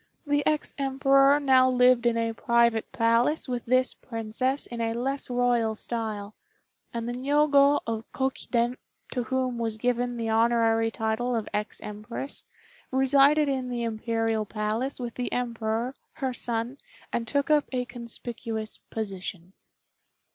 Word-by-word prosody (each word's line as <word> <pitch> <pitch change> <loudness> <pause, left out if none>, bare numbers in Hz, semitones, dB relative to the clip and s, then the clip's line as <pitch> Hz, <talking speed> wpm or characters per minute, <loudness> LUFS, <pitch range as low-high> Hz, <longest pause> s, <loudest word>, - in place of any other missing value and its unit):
The 290 0 +1
ex 305 -1 +1
Emperor 275 +1 +4
now 260 -2 +5
lived 250 -1 +4
in 235 -1 +2
a 230 0 0
private 235 -1 +2
palace 230 +7 +2
with 245 -2 -3
this 255 +1 +3
Princess 240 +4 -2
in 235 -1 -6
a 225 0 -1
less 270 +4 -2
royal 245 -3 +1
style; 215 -3 -3 0.6
and 230 0 -4
the 240 - -2
Niogo 285 +2 +4
of 225 0 -4
Kokiden, 250 -2 -1 0.3
to 250 - -1
whom 255 -1 -1
was 225 -2 -2
given 245 +1 0
the 230 -1 -2
honorary 225 0 +3
title 225 +2 -1
of 220 -2 -2
ex 210 +1 -3
Empress, 215 +6 -6 0.4
resided 275 +3 +4
in 260 -2 -1
the 240 -1 -2
Imperial 225 -1 -1
Palace 215 +6 -2
with 240 -2 -4
the 250 - -4
Emperor, 235 0 -2 0.2
her 265 -4 -2
son, 240 +2 -2 0.3
and 230 -1 -1
took 285 +3 0
up 300 -1 +4
a 250 -1 -1
conspicuous 230 -2 -6
position. 190 -4 -5
240 Hz, 140 wpm, -27 LUFS, 225-260 Hz, 0.6 s, now